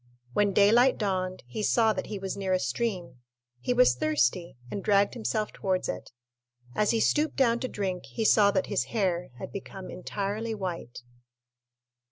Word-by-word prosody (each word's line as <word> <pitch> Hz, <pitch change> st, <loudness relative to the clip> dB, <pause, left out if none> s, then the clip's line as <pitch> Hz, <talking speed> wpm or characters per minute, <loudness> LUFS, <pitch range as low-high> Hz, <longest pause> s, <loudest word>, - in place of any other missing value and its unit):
When 205 Hz, +4 st, +2 dB
daylight 225 Hz, +6 st, +5 dB
dawned 185 Hz, -3 st, -2 dB
he 125 Hz, -, -5 dB
saw 220 Hz, +1 st, +3 dB
that -, -, -4 dB
he 210 Hz, -, -4 dB
was 195 Hz, -1 st, -4 dB
near 195 Hz, -1 st, -1 dB
a 185 Hz, -, +3 dB
stream; 175 Hz, -, -3 dB, 0.4 s
he 185 Hz, -, -2 dB
was 250 Hz, -, +5 dB
thirsty, 145 Hz, +2 st, 0 dB
and 200 Hz, -, -4 dB
dragged 200 Hz, -1 st, +3 dB
himself 220 Hz, -2 st, -2 dB
towards 185 Hz, -1 st, -1 dB
it. 90 Hz, -, -5 dB, 0.6 s
As 210 Hz, -, +2 dB
he 230 Hz, -, +2 dB
stooped 300 Hz, +6 st, +2 dB
down 235 Hz, -3 st, +3 dB
to 255 Hz, -, -2 dB
drink, 190 Hz, -6 st, -4 dB
he 225 Hz, -, -3 dB
saw 210 Hz, -1 st, +6 dB
that 190 Hz, -2 st, +1 dB
his 125 Hz, -, -1 dB
hair 180 Hz, -, -1 dB
had -, -, -7 dB
become 190 Hz, -1 st, -8 dB
entirely 205 Hz, +4 st, -3 dB
white. 175 Hz, -, -6 dB
200 Hz, 170 wpm, -28 LUFS, 180-220 Hz, 0.6 s, saw